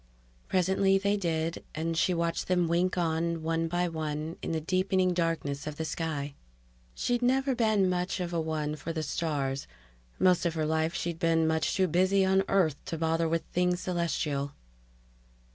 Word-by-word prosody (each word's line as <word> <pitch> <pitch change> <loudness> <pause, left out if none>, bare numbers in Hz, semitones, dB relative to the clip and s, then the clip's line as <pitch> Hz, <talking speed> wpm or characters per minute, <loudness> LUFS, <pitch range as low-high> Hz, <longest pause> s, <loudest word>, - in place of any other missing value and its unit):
Presently 190 +1 +3
they 200 +1 +1
did, 165 -4 -1
and 165 +1 -1
she 170 - +2
watched 170 -1 -1
them 180 -2 +2
wink 175 +3 +1
on, 165 -1 0
one 165 0 0
by 175 +1 0
one, 155 0 -3
in - - -3
the 160 - 0
deepening 185 +2 +1
darkness 165 -4 -1
of 150 - -4
the 160 - -3
sky. 150 -3 -3 0.6
She'd 245 0 0
never 265 +2 +2
been 220 -5 +2
much 180 +1 -1
of 175 -1 -3
a 165 - +1
one 155 -1 -2
for 155 +2 -5
the 160 -1 -3
stars; 140 -4 -2 0.5
most 185 -1 +4
of 170 -2 0
her 155 -1 0
life 160 +2 0
she'd 170 -3 -3
been 165 -2 +3
much 160 0 +1
too 190 -1 +3
busy 190 +3 +3
on 190 0 +4
Earth 165 -7 +1
to 165 - -4
bother 165 +1 +1
with 165 0 0
things 180 0 +1
celestial. 150 -5 -1
165 Hz, 175 wpm, -29 LUFS, 160-185 Hz, 0.6 s, most